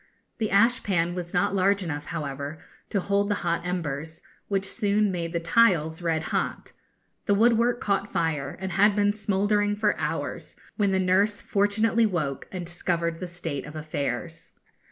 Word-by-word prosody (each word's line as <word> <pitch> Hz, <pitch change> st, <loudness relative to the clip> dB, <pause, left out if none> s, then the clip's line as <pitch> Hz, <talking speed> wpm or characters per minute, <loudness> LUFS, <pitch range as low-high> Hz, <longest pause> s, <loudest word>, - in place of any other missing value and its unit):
The 215 Hz, -2 st, 0 dB
ashpan 200 Hz, -5 st, +2 dB
was 175 Hz, -1 st, -5 dB
not 175 Hz, +2 st, +1 dB
large 195 Hz, +1 st, +2 dB
enough, 145 Hz, -4 st, -4 dB
however, 145 Hz, -1 st, -4 dB, 0.3 s
to 200 Hz, -, 0 dB
hold 200 Hz, +2 st, +1 dB
the 205 Hz, -, +2 dB
hot 170 Hz, 0 st, 0 dB
embers, 160 Hz, -3 st, -4 dB, 0.2 s
which 195 Hz, -1 st, 0 dB
soon 210 Hz, -2 st, +1 dB
made 170 Hz, -2 st, -3 dB
the 170 Hz, -, -1 dB
tiles 165 Hz, -3 st, +3 dB
red 165 Hz, -2 st, 0 dB
hot. -, -, -2 dB, 0.5 s
The 200 Hz, -, +4 dB
woodwork 235 Hz, +2 st, +3 dB
caught 200 Hz, 0 st, -1 dB
fire, 155 Hz, -4 st, -1 dB
and 190 Hz, 0 st, -4 dB
had 200 Hz, +3 st, +4 dB
been 205 Hz, 0 st, +3 dB
smouldering 205 Hz, 0 st, +1 dB
for 210 Hz, 0 st, +1 dB
hours, -, -, -4 dB, 0.2 s
when 205 Hz, -3 st, +2 dB
the 190 Hz, -, +2 dB
nurse 195 Hz, +3 st, +2 dB
fortunately 220 Hz, +3 st, +2 dB
woke 155 Hz, -9 st, -2 dB
and 180 Hz, -2 st, -5 dB
discovered 170 Hz, -1 st, -2 dB
the 180 Hz, -, -4 dB
state 165 Hz, -6 st, -5 dB
of 150 Hz, -, -10 dB
affairs. 155 Hz, +2 st, -4 dB
185 Hz, 160 wpm, -26 LUFS, 165-205 Hz, 0.5 s, The